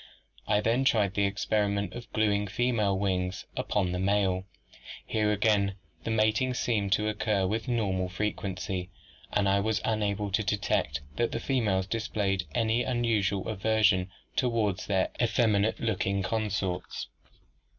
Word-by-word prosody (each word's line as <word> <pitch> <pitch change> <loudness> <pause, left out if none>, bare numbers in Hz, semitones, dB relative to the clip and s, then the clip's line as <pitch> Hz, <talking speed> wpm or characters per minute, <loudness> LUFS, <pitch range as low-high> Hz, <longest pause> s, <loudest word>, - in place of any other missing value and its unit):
"'I 105 0 +3
then 115 +5 +2
tried 105 -7 +2
the 100 0 +2
experiment 100 -1 0
of 120 -1 -9
gluing 105 -1 +1
female 105 -2 +1
wings 95 -1 -1
upon 95 -4 0
the 90 - -2
male. 95 -1 +1 0.6
Here 105 -1 +1
again 100 -2 +2 0.3
the - - -2
mating 110 +3 +2
seemed 105 -5 0
to 105 0 +1
occur 105 -2 0
with 110 +6 -2
normal 95 -7 0
frequency, 95 -1 -3 0.4
and 100 -1 +2
I 100 0 +3
was 110 +1 0
unable 105 -2 0
to 100 - +2
detect 100 -9 0 0.2
that 120 - +1
the - - -2
females 105 -8 +1
displayed 100 -3 -1
any 115 +1 +2
unusual 115 -6 0
aversion 105 -3 +2 0.3
toward 115 -6 +1
their 95 -2 0
effeminate 110 -3 +2
looking 100 -3 0
consorts. 100 -3 -2
105 Hz, 135 wpm, -29 LUFS, 95-110 Hz, 0.6 s, I